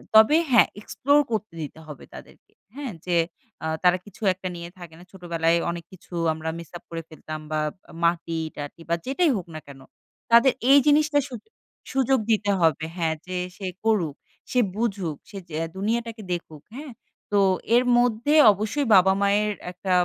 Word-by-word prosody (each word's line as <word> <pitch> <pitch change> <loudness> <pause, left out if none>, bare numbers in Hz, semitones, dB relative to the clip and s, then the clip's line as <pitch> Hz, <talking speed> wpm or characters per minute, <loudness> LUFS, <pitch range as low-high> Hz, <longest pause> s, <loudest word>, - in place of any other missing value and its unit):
তবে 220 +8 +7
হ্যাঁ, 240 - +7
এক্সপ্লোর 285 +6 +2
করতে 215 -4 -2
দিতে 155 +1 -7
হবে 150 -3 -10
তাদেরকে। - - -14 0.2
হ্যাঁ? 275 -6 -5
যে 175 -1 +2 0.5
আ - - -1 0.2
তারা 180 0 +5
কিছু 205 - -16
একটা 185 0 -7
নিয়ে 170 0 -7
থাকে 175 -3 -11
না। - - -13
ছোটবেলায় 170 -3 0
অনেক 170 -1 -7
কিছু 185 -1 -16 0.2
আমরা 160 0 -5
মিস 170 - -10
আপ - - -21
করে 165 -1 -5
ফেলতাম 155 0 -8
বা 155 - 0 0.4
মাটি-টাটি 165 -3 -2
বা 170 - +3
যেটাই 295 +5 +2
হোক 180 - -6
না - - -4
কেনো 135 -1 -13 0.5
তাদের 235 +3 +6 0.2
এই 285 - +9
জিনিসটা 300 0 +4
সুদু 250 - -10 0.4
সুযোগ 265 0 +2
দিতে 205 -2 +2
হবে। 160 -1 +2
হ্যাঁ, 165 -2 0
যে 185 0 -3 0.2
সে 200 - -6 0.2
করুক, 195 -10 +1 0.4
সে 250 - +2 0.2
বুঝুক, 200 -8 -2
সে 200 - -9
যে 155 - -7 0.2
দুনিয়াটাকে 225 +2 -2
দেখুক। 160 -3 -7
হ্যাঁ? 285 +1 -8 0.4
তো 205 - +3 0.4
এর 245 - +5
মধ্যে 245 +3 +2 0.2
অবশ্যই 215 +8 -2
বাবা-মায়ের 200 +3 +3 0.2
একটা 180 +1 -5
190 Hz, 165 wpm, -24 LUFS, 165-235 Hz, 0.5 s, এই